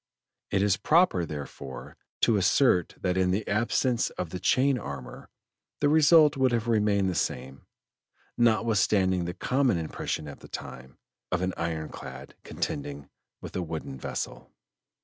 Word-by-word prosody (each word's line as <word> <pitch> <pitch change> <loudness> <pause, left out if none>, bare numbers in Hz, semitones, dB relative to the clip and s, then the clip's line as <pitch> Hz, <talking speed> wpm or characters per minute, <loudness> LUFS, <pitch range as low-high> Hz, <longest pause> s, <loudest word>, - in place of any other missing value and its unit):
It 100 0 +1
is 100 -2 +3
proper 130 - +3
therefore 70 -3 -8 0.3
to 115 - +4
assert 95 - +3
that 90 -1 0
in 95 -1 +2
the 100 +3 -1
absence 120 +3 +1
of 85 -3 -6
the 90 - -4
chain 130 +7 +2
armor 65 - -8 0.5
the 145 - +3
result 155 0 +6
would 130 -2 +2
have 115 -1 0
remained 105 -3 +2
the 95 - 0
same, 65 -4 -3 0.7
notwithstanding 105 -5 +2
the 90 +1 -4
common 130 -5 +1
impression 80 -1 -4
at 70 - -9
the - - -13
time, 65 0 -9 0.3
of 90 0 0
an 95 0 -1
"iron 80 -2 -3
clad" 65 -1 -9
contending 70 0 -5 0.3
with - - -9
a 95 - -1
wooden 80 -5 -6
vessel. - - -5
95 Hz, 150 wpm, -27 LUFS, 80-115 Hz, 0.7 s, result